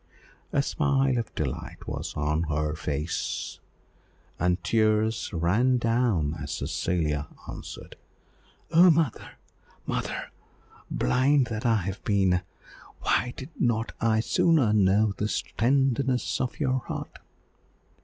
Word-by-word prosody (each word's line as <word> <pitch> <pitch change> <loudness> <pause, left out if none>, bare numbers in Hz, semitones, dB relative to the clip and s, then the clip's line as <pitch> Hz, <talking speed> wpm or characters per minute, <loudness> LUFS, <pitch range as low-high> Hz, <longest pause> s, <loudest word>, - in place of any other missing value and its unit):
A 140 - +2
smile 135 -4 +1
of 115 - -5
delight 70 -5 -4
was - - -4
on 75 +2 0
her 75 0 0
pale 75 - -3
face, 75 +1 -3 0.8
and 90 +2 +1
tears 110 0 +2
ran 105 +9 +2
down 115 -10 +1
as 70 +1 -4
Cecilia 75 -4 -1 0.2
answered - - -9 0.7
"Oh, 175 +3 +7
mother, 160 -1 +1 0.5
mother! - - -3 0.6
blind 135 +1 +3
that 110 +2 -1
I 115 - +4
have 95 +1 -5
been. 95 -3 +2 0.6
Why 125 0 +1
did 130 - -7
not 115 -2 +1
I 110 -1 +3
sooner 130 -1 +3
know 105 +1 +3
this 105 +1 -1
tenderness 130 +1 +1
of 125 - -3
your 130 -3 +1
heart?" 120 - -7
110 Hz, 115 wpm, -27 LUFS, 90-130 Hz, 0.8 s, Oh